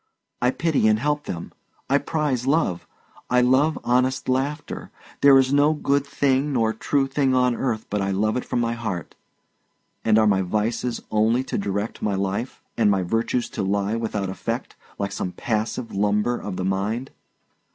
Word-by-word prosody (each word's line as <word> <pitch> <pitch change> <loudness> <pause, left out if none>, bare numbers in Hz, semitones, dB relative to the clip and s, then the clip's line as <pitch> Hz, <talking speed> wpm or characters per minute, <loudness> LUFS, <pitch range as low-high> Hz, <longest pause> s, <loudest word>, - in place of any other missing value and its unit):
I 125 - +4
pity 150 -4 +1
and 110 0 +4
help 145 +5 -1
them. 85 -1 -5 0.4
I 140 +1 +3
prize 145 -5 -1
love; 140 - +1 0.4
I 125 0 +4
love 135 +5 +3
honest 130 +1 +1
laughter; 140 +4 -2 0.3
there 140 -1 +8
is 135 0 +3
no 145 +2 +4
good 140 -1 0
thing 140 +1 +1
nor 115 -3 +2
true 135 +5 +1
thing 135 -1 +1
on 125 -1 +3
earth 115 -4 -2
but 105 0 -1
I 100 - 0
love 105 +3 +1
it 125 - -1
from 120 - -1
my 115 0 0
heart. 105 -8 -4 0.9
And 110 -1 +4
are 110 - +5
my 100 -2 +3
vices 110 +5 -1
only 110 +4 +2
to 130 - -5
direct 100 +2 -3
my 100 -2 0
life, 100 +6 -3
and 110 -3 +3
my 95 -2 +2
virtues 115 +5 0
to - - -3
lie 100 +2 0
without 105 -4 -2
effect, 95 - -4 0.2
like 100 0 -2
some 90 -2 -3
passive 110 +4 -2
lumber 105 +4 +1
of 105 -5 -5
the 90 - -2
mind? 105 +7 -1
115 Hz, 175 wpm, -23 LUFS, 105-135 Hz, 0.9 s, there